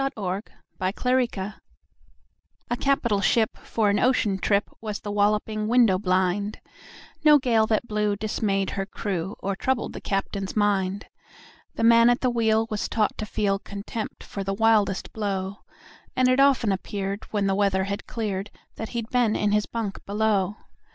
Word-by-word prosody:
Y 270 - +1
Z - - -24
A - - -6
Nautical 190 +3 -3 0.8
Ballad 195 +2 -5 1.2
A - - +3
CAPITAL 240 -6 +1
ship 220 +1 +2
for 215 -3 0
an 205 - +1
ocean 220 -6 +2
trip 200 +2 +1
Was 210 -2 -4
The 205 - -5
Walloping 210 +1 +1
Window 230 -5 +4
blind 190 +2 0 0.6
No 300 -1 +8
gale 230 -5 +2
that 220 +1 +1
blew 210 -1 0
dismayed 200 -2 -1
her 195 -1 -3
crew 190 -2 -3
Or 195 0 -2
troubled 260 +3 -1
the - - -7
captain's 195 -1 -3
mind. 200 -2 +1 0.7
The - - -2
man 230 +1 +7
at 245 - +2
the 255 - +2
wheel 225 -1 +2
was 210 - -2
taught 215 -2 +1
to 215 - -3
feel 195 -2 0
Contempt 205 +2 -6
for 200 - -5
the 195 0 -2
wildest 210 -3 +2
blow, 195 -2 -3 0.6
And 255 0 +3
it 255 +1 +3
often 270 -6 +4
appeared, 195 +1 -3
when 205 -2 0
the 195 - +2
weather 195 -1 +2
had 200 +2 -4
cleared, 205 -4 -3 0.3
That 225 - -5
he'd 230 -1 -4
been 240 -4 +2
in 210 -1 +1
his 210 0 +1
bunk 225 -4 -4
below. 205 -2 +1
210 Hz, 170 wpm, -25 LUFS, 195-225 Hz, 1.2 s, No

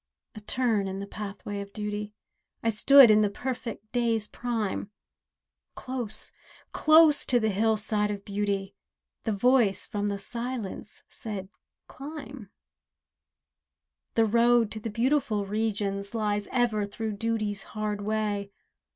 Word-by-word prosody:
A 215 - -8
turn 215 -2 0
in 190 0 -4
the 200 - -4
pathway 205 0 -6
of 200 0 -10
duty— 210 0 -4 0.5
I 230 - +2
stood 255 +3 +8
in 215 0 +5
the 210 - +3
perfect 230 -2 -5
day's 230 -3 +1
prime, 225 -4 -3 0.9
Close, 255 -4 -5 0.4
close 310 -1 +6
to 245 - +4
the 220 -1 +1
hillside 215 0 +1
of 200 -1 -5
beauty 200 -1 -2 0.5
The 220 - +1
Voice 220 -1 +3
from 205 0 -2
the 200 -1 -1
Silence 235 -1 -5
said 200 -4 -6 0.4
"Climb" 275 -6 -9 1.7
The 225 - +4
road 235 0 +4
to 220 - -4
the 225 - -4
beautiful 230 -2 +1
Regions 200 -1 -2
Lies 210 -2 -1
ever 230 -5 +1
through 220 +2 -4
Duty's 215 -2 -1 0.2
hard 210 -1 -2
way. 205 -1 -1
215 Hz, 125 wpm, -28 LUFS, 205-235 Hz, 1.7 s, stood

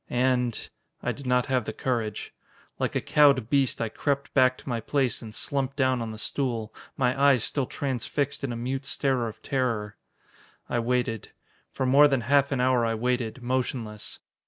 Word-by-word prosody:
And 125 -2 +1 0.4
I - - 0
did 140 -2 -8
not 125 -1 +3
have 130 -4 0
the - - -4
courage. 115 -5 -2 0.5
Like - - -1
a - - +1
cowed 140 -6 +4
beast 140 -3 +2
I 115 - -1
crept 140 +4 -2
back 130 -1 +4
to - - -16
my 120 -3 -1
place 130 +2 0
and 110 - -8
slumped 135 +4 -2
down 130 -3 +2
on 115 - -3
the 110 - -7
stool, 115 -2 -2 0.2
my 125 -1 +2
eyes 140 -5 +5
still 135 -4 -1
transfixed 140 +1 -2
in 135 - -1
a - - -3
mute 130 +3 -3
stare 130 -4 +1
of 110 0 -9
terror. 115 -6 -1 0.7
I 120 - 0
waited. 115 -2 -1 0.4
For 130 - -2
more 140 +3 +7
than 135 -3 +1
half 140 +4 +3
an 135 - 0
hour 125 -1 +3
I 115 -1 +1
waited, 125 +1 -1
motionless. 120 -4 -3
125 Hz, 180 wpm, -27 LUFS, 115-135 Hz, 0.7 s, more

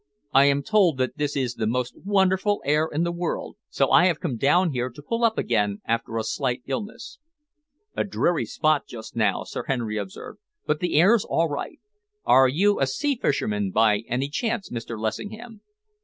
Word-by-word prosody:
"I 135 +1 +6
am 140 0 +2
told 195 -8 +3
that 130 -1 -2
this 145 -1 -1
is 130 -4 -1
the 110 -2 -2
most 125 +2 -2
wonderful 195 +1 +1
air 150 +3 +2
in 155 +3 0
the 170 - 0
world, 170 0 -4
so - - +1
I 180 - +6
have 170 -4 0
come 125 - -3
down 165 +9 +3
here 125 -1 -2
to 125 - -15
pull 230 +8 -2
up 225 -1 +3
again 105 -3 0
after 115 0 -2
a 110 - -1
slight 125 0 -2
illness." 210 - -6 0.8
"A - - +1
dreary 175 - 0
spot 155 +4 +1
just 110 -2 -10
now," 105 -4 +1
Sir - - -6
Henry 115 -5 -2
observed, 95 -2 -8 0.3
"but 150 0 0
the 175 -3 -1
air's 205 +5 +5
all 165 0 0
right. 145 - -5 0.5
Are 130 0 +6
you 195 +10 +2
a 135 - +2
sea 285 - -1
fisherman, 105 - -1
by 105 +1 +3
any 130 +3 -1
chance, 225 +6 -2
Mr. 115 -1 -5
Lessingham?" 210 - -5
140 Hz, 185 wpm, -24 LUFS, 120-190 Hz, 0.8 s, I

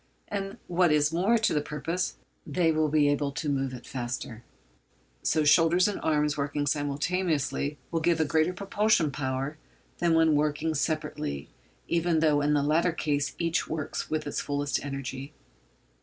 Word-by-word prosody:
And 195 -1 -4
what 175 -1 +2
is 150 +1 +3
more 195 +8 +3
to 220 - +1
the 150 - +1
purpose, 155 +5 -3 0.3
they 170 -3 +1
will 155 0 +2
be 150 -1 +3
able 145 0 +1
to 160 +1 -4
move 135 -2 0
it 125 -1 -9
faster. 120 -2 -5 0.8
So 155 - +2
shoulders 165 +5 +5
and 205 - -2
arms 150 -1 +1
working 145 0 -1
simultaneously 145 0 -1
will 165 - +1
give 165 0 +2
a 160 - +3
greater 160 +3 +2
propulsive 200 -3 +1
power 135 +2 -3 0.4
than 170 -1 +3
when 160 -1 +4
working 150 +2 +1
separately, 150 - -2 0.4
even 170 -1 +1
though 150 -2 +3
in 150 +1 +2
the 145 - +2
latter 165 +4 +2
case 145 -3 -1
each 170 0 0
works 155 -2 -4
with 155 -1 -1
its 145 - -2
fullest 145 0 -1
energy. 135 0 -5
150 Hz, 160 wpm, -28 LUFS, 145-165 Hz, 0.8 s, shoulders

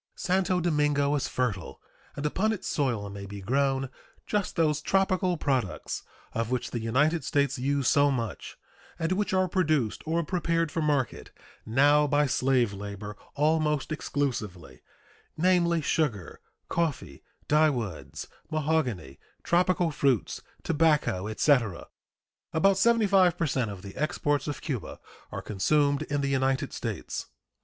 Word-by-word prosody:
Santo 185 -1 +1
Domingo 150 -4 +1
is 145 -3 0
fertile, 105 -9 -3 0.4
and 145 - -4
upon 200 +8 +1
its 220 - -4
soil 120 -8 -1
may 100 0 -7
be 100 0 -7
grown 135 +5 0 0.4
just 210 -2 -1
those 150 -3 +2
tropical 185 -1 +1
products 125 - -2 0.3
of 115 0 -1
which 125 0 -2
the 120 - -2
United 145 +9 +1
States 140 -2 0
use 140 0 0
so 145 -1 +4
much, 120 -5 -4 0.4
and 165 +1 -2
which 205 +3 0
are 185 0 +2
produced 155 - 0
or 165 +1 +1
prepared 165 -2 0
for 165 - -1
market 145 -4 -1 0.4
now 145 +5 +4
by 145 +1 +3
slave 130 -5 +2
labor 100 +1 -7 0.2
almost 150 0 +1
exclusively, 115 - -3 0.6
namely, 170 -1 +3
sugar, 135 - -1 0.3
coffee, 135 - -2 0.3
dyewoods, 135 - 0 0.2
mahogany, 140 - -1 0.2
tropical 175 -1 +2
fruits, 135 -6 0 0.2
tobacco, 150 - +2
etc. 110 - +1 0.7
About 195 +4 +3
75 195 -5 +4
per 170 - 0
cent 130 -6 0
of 100 -2 -8
the 100 - -9
exports 145 -1 0
of 145 - -4
Cuba 135 -8 -5 0.3
are - - -5
consumed 140 +8 +1
in 145 -2 -2
the 140 - 0
United 135 +1 0
States. 115 -4 -4
145 Hz, 130 wpm, -28 LUFS, 120-165 Hz, 0.7 s, so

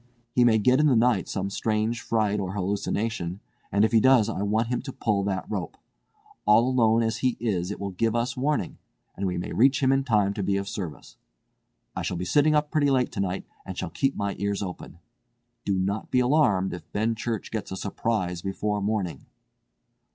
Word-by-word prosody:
He 125 - +4
may 115 -2 +5
get 125 +5 +3
in 150 - +4
the 135 - +4
night 115 -4 +3
some 95 0 -3
strange 110 +2 -1
fright 105 -2 0
or 95 -1 -3
hallucination; 100 -1 -2 0.3
and 100 +3 +4
if - - 0
he 115 - +5
does 120 -2 +5
I 105 - -3
want 110 +3 0
him 125 -1 -1
to 135 - -7
pull 105 -5 0
that 95 -2 -2
rope. - - -4 0.7
All 115 +3 +6
alone 115 -3 +3
as 110 0 -1
he 125 +1 0
is 95 -6 -1
it 105 - -5
will 100 0 -4
give 115 +5 0
us 120 +2 0
warning, 145 +3 -1 0.4
and 95 +1 -2
we 90 -1 -2
may 85 - -4
reach 135 +3 +3
him 130 - +4
in 135 0 +2
time 105 -6 +2
to 100 - -4
be 100 0 +1
of 100 0 -3
service. 90 -6 -7 0.8
I - - -2
shall 90 - -2
be 90 - -3
sitting 150 - +3
up 150 0 +1
pretty 150 -3 +2
late 130 -2 +2
tonight 95 -1 -2 0.2
and 95 -1 -7
shall 90 - -4
keep 135 +9 0
my 100 -1 -2
ears 100 0 -1
open. 90 -3 -8 0.7
Do 100 -1 +1
not 100 +3 -2
be 125 - +2
alarmed 125 -8 +2
if 90 - -9
Benchurch 115 +1 -2
gets 105 -4 -4
a 95 - -4
surprise 95 -3 -2
before 105 +2 -2
morning." 100 -8 -2
105 Hz, 205 wpm, -26 LUFS, 95-120 Hz, 0.8 s, All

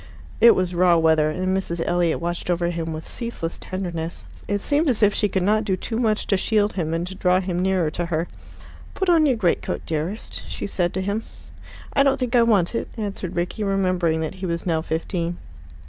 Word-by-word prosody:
It 235 - +8
was 185 -1 0
raw 175 -1 +4
weather, 160 -2 +3
and 185 +4 -1
Mrs. 175 -3 -2
Elliot 175 -2 +1
watched 175 +1 -3
over 175 0 +1
him 165 -1 -3
with 155 0 -6
ceaseless 230 -9 -5
tenderness. 175 -3 -4 0.2
It 205 - +1
seemed 290 +7 +1
as 230 -4 +2
if 205 0 +5
she 210 - +1
could 190 -1 0
not 215 +3 +3
do 190 -3 0
too 225 +4 -3
much 215 -3 +1
to 195 - +2
shield 210 +1 +1
him 165 -4 -2
and 165 +1 -1
to 185 - -7
draw 185 0 +2
him 180 -2 -2
nearer 185 -4 +1
to 175 +2 -3
her. 165 0 -1 0.7
"Put 380 -1 0
on 325 -3 +5
your 255 -4 +2
greatcoat, 180 -6 0
dearest," 165 +7 -4
she - - -4
said 175 -3 0
to 190 - 0
him. 200 +3 -1 0.7
"I - - +4
don't 275 -1 +3
think 250 -1 -1
I 240 - +6
want 210 -6 +3
it," 230 - -2
answered 200 -4 -4
Rickie, 175 +5 -2
remembering 185 -5 +1
that 160 - -3
he 190 - -2
was 170 -1 -3
now 165 -3 +1
fifteen. 170 +1 -2
185 Hz, 210 wpm, -23 LUFS, 170-210 Hz, 0.7 s, It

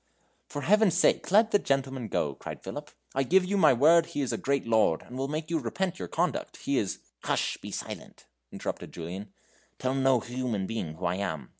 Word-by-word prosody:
"For 145 - -5
Heaven's 210 -2 +4
sake, 180 - +3
let 215 +4 +5
the 205 - +5
gentleman 135 - -1
go," 75 -7 0
cried - - -8
Philip; - - -6 0.2
"I 135 - +1
give 180 +8 +4
you 200 +2 -1
my 195 - +6
word 160 +6 +5
he 145 - -3
is 135 - -1
a - - -1
great 140 0 0
lord, 110 -8 +3
and 125 - -11
will 135 +1 -1
make 155 +3 -4
you 165 - +2
repent 180 +9 -2
your - - -4
conduct. 175 +2 -1
He 140 -1 0
is 100 - -2
" - - -39
"Hush; - - 0
be - - -9
silent," - - -7 0.3
interrupted - - -5
Julian; 90 +4 -6 0.5
"tell 130 0 -1
no 135 -2 +3
human 120 -4 -2
being 95 -8 -4
who - - -5
I 90 +1 +1
am. 80 -10 -3
135 Hz, 210 wpm, -28 LUFS, 110-165 Hz, 0.5 s, my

